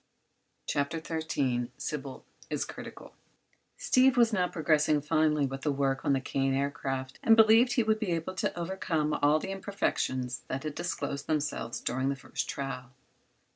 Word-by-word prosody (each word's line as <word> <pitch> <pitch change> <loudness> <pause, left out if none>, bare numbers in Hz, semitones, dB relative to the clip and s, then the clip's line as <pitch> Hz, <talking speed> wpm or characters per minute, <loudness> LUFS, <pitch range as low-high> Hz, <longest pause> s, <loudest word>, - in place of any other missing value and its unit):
CHAPTER 140 +3 -1
XIII 140 -7 -1
SYBIL 140 -3 -5 0.2
IS - - -1
CRITICAL - - -10 0.6
Steve 260 0 +4
was 235 -2 +5
now 180 -3 +2
progressing 155 -3 +2
finely 150 0 +2
with 135 0 -5
the 150 - 0
work 135 -1 0
on 140 - +2
the 135 - +2
Kane 135 +1 0
Aircraft 135 -1 -3
and 225 - +6
believed 225 +3 +6
he 240 - +3
would 220 0 +1
be 215 -4 -2
able 165 +3 -3
to 175 -1 -2
overcome 165 -4 -1
all 145 +1 +5
the 190 - -4
imperfections 130 -10 -2
that 135 - -3
had 155 -1 -3
disclosed 145 -4 -3
themselves 150 -6 -2
during 130 +2 -1
the 140 - 0
first 130 - -5
trial. 130 -2 -5
150 Hz, 160 wpm, -29 LUFS, 135-180 Hz, 0.6 s, and